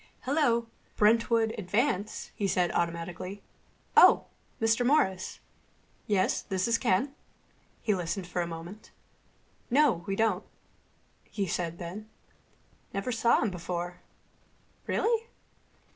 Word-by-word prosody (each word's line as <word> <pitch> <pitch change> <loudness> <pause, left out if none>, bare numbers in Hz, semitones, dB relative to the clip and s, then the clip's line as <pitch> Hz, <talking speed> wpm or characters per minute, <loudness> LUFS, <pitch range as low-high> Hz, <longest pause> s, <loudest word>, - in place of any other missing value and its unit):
"Hello. 255 -4 +2 0.3
Brentwood 225 +1 +3
Advance," 210 +1 -1
he 200 - -1
said 180 -2 +1
automatically.... 170 +3 -3 0.5
"Oh, - - +7 0.3
Mr. 225 +2 +2
Morris.... 215 -9 +1 0.7
Yes, 195 -3 +2
this 190 0 -1
is 230 0 +2
Ken." 255 +4 +1 0.7
He 215 - +2
listened 180 +1 -3
for 175 0 -2
a 170 - -2
moment. 170 +5 -9 0.8
"No, 255 - +3
we 195 - -1
don't," 215 -3 +1 0.9
he 200 - -2
said 170 -2 -2
then. 190 +5 -7 0.9
"Never 195 +6 -2
saw 230 0 +3
him 215 - 0
before.... 175 0 -5 0.9
Really? 460 0 +1
200 Hz, 110 wpm, -29 LUFS, 180-230 Hz, 0.9 s, Oh